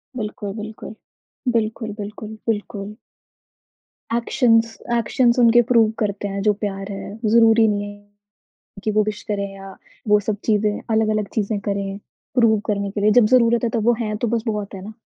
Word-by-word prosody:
बिल्कुल, 210 -3 -5
बिल्कुल। 215 0 -8 0.6
बिल्कुल, 220 -1 -1
बिल्कुल, 215 +1 -7
बिल्कुल। 210 -1 -3 1.2
एक्शंस 230 -2 +2 0.2
एक्शंस 235 +2 +2
उनके 240 0 +6
प्रूफ़ 230 -3 +4
करते 205 -1 -1
हैं 200 0 -3
जो 210 +1 +3
प्यार 200 -1 -5
है, 200 +1 -7
ज़रूरी 225 0 +5
नहीं 205 -1 0
है 205 0 -27 0.5
कि 215 - +1
वो 215 0 +3
विश 210 0 -4
करें 200 -1 -1
या 195 0 -11 0.3
वो 210 0 +5
सब 215 -2 0
चीज़ें 210 -1 +1
अलग-अलग 215 -2 +1
चीज़ें 210 -1 0
करें 200 -1 -3 0.4
प्रूव 230 -4 +4
करने 200 -1 -1
के 205 - -4
लिए, 210 +1 +4
जब 230 0 +5
ज़रूरत 235 0 +4
है 230 - 0
तब 225 -3 -1
वो 240 - +6
हैं, 215 -2 -2
तो 235 +2 -1
बस 230 0 0
बहुत 210 -2 -3
है 190 - -7
ना। 215 - -8
215 Hz, 170 wpm, -21 LUFS, 205-225 Hz, 1.2 s, उनके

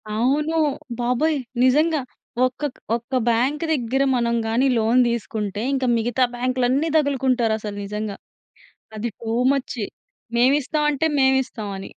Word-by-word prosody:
అవును. 295 +7 +1 0.4
బాబోయ్! 250 +6 +1 0.3
నిజంగా 305 +5 +3 0.5
ఒక్క 255 +3 -4 0.3
ఒక్క 235 +3 -8 0.2
బ్యాంక్ 260 +7 +1
దగ్గర 265 0 0
మనం 235 -1 +1
గాని 240 +5 +2
లోన్ 225 +3 +3
తీసుకుంటే 210 -3 -3
ఇంక 265 -1 0
మిగతా 240 +3 +1
బ్యాంక్‌లు 255 0 0
అన్నీ 285 +6 +1
తగులుకుంటారు 260 -6 +1
అసలు 210 -1 -6
నిజంగా. 210 0 -4 0.8
అది 230 +2 -3
టూ 225 0 -3 0.2
మచ్ 270 -3 -3 0.6
మేము 255 +4 +5
ఇస్తాం 300 +2 -1
అంటే 295 +2 0
మేము 265 0 +4
ఇస్తాం 215 -4 -7
అని. 195 - -8
250 Hz, 135 wpm, -22 LUFS, 230-275 Hz, 0.8 s, మేము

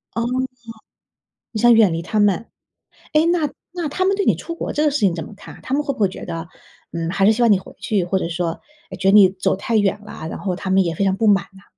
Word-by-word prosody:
哦， 230 - 0 1.3
你 220 - -3
想 240 +1 +6
远 220 -6 +5
离 165 0 -3
他 210 +5 -1
们。 205 +1 +2 0.7
诶， 305 +1 +4
那 340 -3 +1 0.2
那 345 -3 -3
他 370 +6 -1
们 390 +1 +2
对 400 - 0
你 - - +4
出 335 - -7
国 - - -4
这 300 - 0
个 300 - +3
事 290 - -1
情 195 -6 +2
怎 165 -2 -5
么 210 - -12
看 205 - -12
啊？ - - -16
他 - - -7
们 295 - +1
会 285 - -2
不 - - -14
会 200 - +4
觉 185 - -9
得， 165 0 -6 0.4
嗯， 165 0 -3
还 195 +2 +1
是 215 - +6
希 230 +3 -1
望 235 - +5
你 200 - +4
回 - - -13
去？ 200 -5 0
或 190 +2 0
者 170 - -3
说， 170 -1 -3 0.3
诶， 190 - -7
觉 190 +1 0
得 - - +2
你 200 -3 +8
走 185 0 -1
太 225 +4 -1
远 205 -1 +1
了， 185 -6 -8
然 - - -6
后 185 -3 -3
他 190 +1 -5
们 190 +1 +4
也 170 -2 -2
非 200 - -1
常 190 -1 +1
不 220 +2 0
满 200 -3 +4
呐？ 195 0 -17
200 Hz, 305 characters per minute, -20 LUFS, 185-235 Hz, 1.3 s, 你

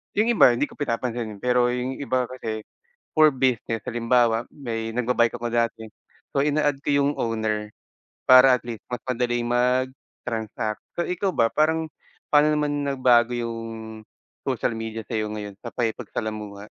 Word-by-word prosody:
yung 215 +3 +3
iba 225 - +6
hindi 120 +5 0
ko - - -15
pinapansinin, 115 -5 -3
pero 125 0 +2
yung 125 +2 -2
iba 130 -3 -1
kasi, 110 -4 -6 0.4
for 155 0 +6
business, 125 -4 0
halimbawa, 120 -1 +2
may 115 -5 -4
nagba-bike 120 -1 +2
ako 120 -1 -4
dati, 115 -1 0 0.5
so 140 - 0
ina-add 145 -1 +1
ko 145 - -5
yung 145 - +2
owner, 110 -2 -1 0.6
para 130 0 +8
at - - -7
least 115 -3 -6
mas 125 -2 -5
madali 120 -1 -1
mag-transact. 120 -3 -2 0.2
So 175 - 0
ikaw 180 +2 -1
ba, 115 0 +3
parang 160 +1 +1 0.4
pa'no 150 +1 +5
naman 145 -1 -1
nagbago 125 -3 +3
yung 115 -1 -3 0.9
social - - 0
media 110 0 -5
sa'yo 110 -2 -2
ngayon, 105 -2 -7
sa 120 - -9
pakikipagsalamuha? 110 -3 -4
120 Hz, 145 wpm, -24 LUFS, 115-130 Hz, 0.9 s, para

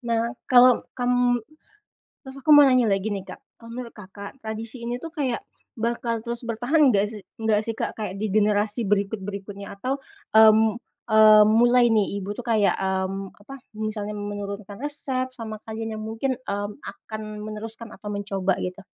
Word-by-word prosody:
Nah, 235 -1 -1 0.2
kalau 250 -1 +7 0.2
kamu 245 -1 +1 0.8
terus 265 -1 -10
aku 290 - -6
mau 290 - +9
nanya 255 -3 +4
lagi 195 +1 0
nih, 195 - -5
Kak. - - -9 0.2
Kalau 230 0 -12
menurut 240 0 -7
Kakak 200 +2 -10
tradisi 225 +2 -6
ini 240 +1 -3
tuh 330 - -8
kayak 275 -7 -1 0.4
bakal 235 0 -1
terus 235 0 -5
bertahan 250 +5 +3
enggak 200 -1 +3
sih 210 -2 -8 0.2
enggak 220 -2 +2
sih, 225 - -3
Kak, - - -3
kayak 210 -4 -4
di 215 - -1
generasi 210 +2 +2
berikut-berikutnya 200 -1 -3
atau, 265 +6 -2 0.4
mmm 220 0 +6 0.3
mmm, 215 -1 +8
mulai 240 +1 +5
nih, 200 -2 +1
ibu 200 +1 -5
tuh 245 - -7
kayak, 210 -5 +3
mmm, 190 0 -2
apa? 245 +7 -11 0.2
Misalnya 215 -1 -4
menurunkan 205 0 -6
resep 265 -3 -2
sama 220 -3 -7
kalian 225 0 -4
yang - - -6
mungkin, 225 +5 -2
mmm, 205 +2 -4
akan 215 0 -8 0.2
meneruskan 220 +1 -7
atau 210 - -11
mencoba 195 -2 -1
gitu? 185 +2 -5
220 Hz, 165 wpm, -24 LUFS, 205-240 Hz, 0.8 s, mau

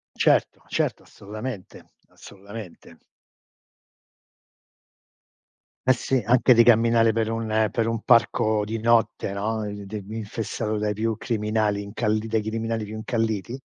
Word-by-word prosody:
Certo, - - +2
certo - - -1
assolutamente, 110 0 -9 0.2
assolutamente. 100 -1 -12 2.9
Eh 130 - +7
sì, 130 +1 -1
anche 125 +2 +5
di 115 0 +6
camminare 115 -1 +4
per 115 -1 0
un 110 -1 0
per 115 -1 0
un 115 -1 -2
parco 110 -3 +3
di 110 +1 -4
notte, 115 -3 +2
no, 110 +2 -2
in 100 -1 -7
di 105 -1 -6
infestato 110 0 -4
dai 105 0 -1
più 110 +1 -1
criminali 105 -2 -1
incalli 105 +2 -2
dai 110 -1 0
criminali 115 0 -2
più 105 +1 -7
incalliti, 110 0 -2
110 Hz, 125 wpm, -24 LUFS, 105-115 Hz, 2.9 s, Eh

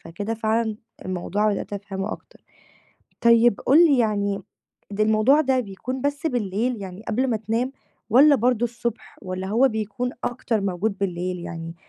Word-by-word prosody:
فكده 205 +7 -5
فعلًا 220 0 0 0.3
الموضوع 195 +3 0
بدأت 200 - -5
أفهمُه 200 0 -4
أكتر. - - -12 0.8
طيب 235 -2 +5
قُل 285 +4 +4
لي 285 -5 +3
يعني 200 -3 0 0.5
الموضوع 215 +7 +3
ده 265 -3 +2
بيكون 245 +4 -5
بس 285 +3 -1
بالليل 240 -2 -1
يعني 190 +1 -8
قبل 245 +5 +1
ما 225 - +1
تنام، 225 +5 -2 0.4
والَّا 280 +6 +7
برضه 240 -1 +1
الصبح 235 0 -5
والَّا 185 0 -4
هو 235 +6 +4
بيكون 220 +2 -3
أكتر 230 -2 -1
موجود 195 +1 -2
بالليل 180 -1 -2
يعني 165 -1 -7
220 Hz, 145 wpm, -23 LUFS, 195-245 Hz, 0.8 s, والَّا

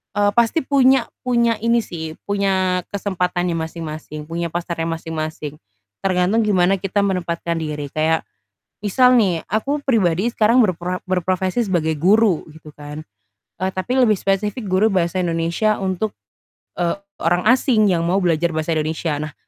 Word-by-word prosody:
eee, 205 0 +3
pasti 235 +8 +2
punya 265 -3 +4 0.2
punya 235 -3 +2
ini 235 +1 +2
sih, 160 -4 -6
punya 190 -2 +1
kesempatannya 180 -3 -1
masing-masing, 155 -2 -6
punya 170 +1 -2
pasarnya 170 -1 -3
masing-masing. 155 -2 -5 0.4
Tergantung 185 +3 +2
gimana 190 -1 +2
kita 195 +1 0
menempatkan 170 -3 -1
diri. 150 -3 -4
Kayak 160 +1 +1 0.6
misal 250 +5 +4
nih, 180 -7 +1
aku 280 +7 0
pribadi 215 -4 +1
sekarang 230 +3 +4
berpra 180 -2 -1
berprofesi 185 +3 0
sebagai 160 -4 +1
guru 200 +1 +3
gitu 155 -1 -13
kan. 150 +1 -8 0.6
Eee, 190 +1 0
tapi 245 +8 -1
lebih 235 -4 +5
spesifik 205 +2 -1
guru 185 +3 +3
bahasa 180 0 0
Indonesia 170 +5 0
untuk, 190 +3 -2 0.7
eee, 175 +1 +1 0.3
orang 175 +2 +1
asing 235 -5 +3
yang 170 -2 +1
mau 185 +3 +2
belajar 170 0 +2
bahasa 155 +1 -1
Indonesia. 155 +1 -1
Nah, 150 - -12
185 Hz, 140 wpm, -20 LUFS, 165-210 Hz, 0.7 s, lebih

